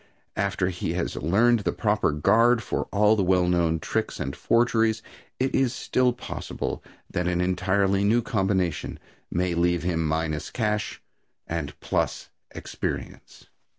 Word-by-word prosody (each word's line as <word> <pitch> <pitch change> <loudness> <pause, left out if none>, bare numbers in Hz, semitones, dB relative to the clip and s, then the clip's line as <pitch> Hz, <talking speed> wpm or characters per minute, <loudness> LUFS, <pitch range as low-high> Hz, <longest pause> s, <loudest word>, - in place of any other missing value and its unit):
After 95 -2 0
he 85 -2 -3
has 90 0 -2
learned 110 - +3
the 100 - -1
proper 105 -6 +1
guard 110 +10 +3
for - - -2
all 105 +1 +3
the 105 - +1
well 90 -1 +3
known 85 -2 +2
tricks - - -2
and 70 - -3
forgeries 115 -1 +2 0.4
it 130 +1 0
is 130 -2 +2
still 125 -1 +1
possible 125 - -5 0.3
that 90 0 -1
an 90 -1 0
entirely 95 +2 +1
new 115 +4 +3
combination 95 - -1 0.3
may 90 0 0
leave 85 0 +1
him 85 -2 0
minus 80 -1 -1
cash 105 -2 -2 0.4
and 80 -4 -4
plus - - -2 0.2
experience. - - -6
95 Hz, 140 wpm, -25 LUFS, 85-110 Hz, 0.4 s, learned